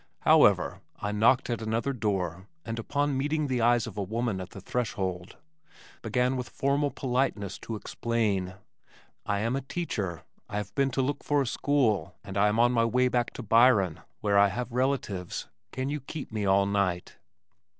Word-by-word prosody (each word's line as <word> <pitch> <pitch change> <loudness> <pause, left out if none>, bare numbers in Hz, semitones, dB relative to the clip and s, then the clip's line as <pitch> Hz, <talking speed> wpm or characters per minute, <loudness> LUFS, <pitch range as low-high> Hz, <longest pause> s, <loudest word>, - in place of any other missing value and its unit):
However, - - +4 0.2
I 100 - -2
knocked 110 +5 +3
at 120 - -2
another 115 +5 -1
door 95 -6 -2 0.2
and 115 0 -4
upon 145 +4 0
meeting 150 +3 0
the 130 -3 0
eyes 120 0 +3
of - - -7
the 105 - -3
woman 110 0 -2
at 90 - -7
the 100 - -10
threshold, 95 -5 -3 0.6
began 125 +3 +1
with 125 -1 -4
formal 140 +1 +1
politeness 125 -8 -1
to 115 - -5
explain, 105 -5 -1 0.7
"I 100 -1 0
am 115 +4 0
a 135 - -1
teacher, 100 - -4 0.3
I 105 - -3
have 105 -1 -4
been 135 -1 +2
to 135 - +3
look 140 +2 -2
for 145 -1 +2
a - - -4
school, 120 -8 +1
and 100 -1 -8
I 100 +1 +4
am 105 +1 +1
on 120 +1 +5
my 115 -2 +3
way 125 +2 +2
back 120 -1 +1
to 125 - -7
Byron, 115 -7 +4 0.2
where 100 -1 +3
I 100 - +7
have 120 +5 -4
relatives. 120 -8 -2 0.2
Can 130 +2 -3
you 150 +1 -2
keep 140 +1 -7
me 105 -2 -2
all 100 +1 +4
night?" 100 -3 -1
115 Hz, 180 wpm, -28 LUFS, 100-130 Hz, 0.7 s, I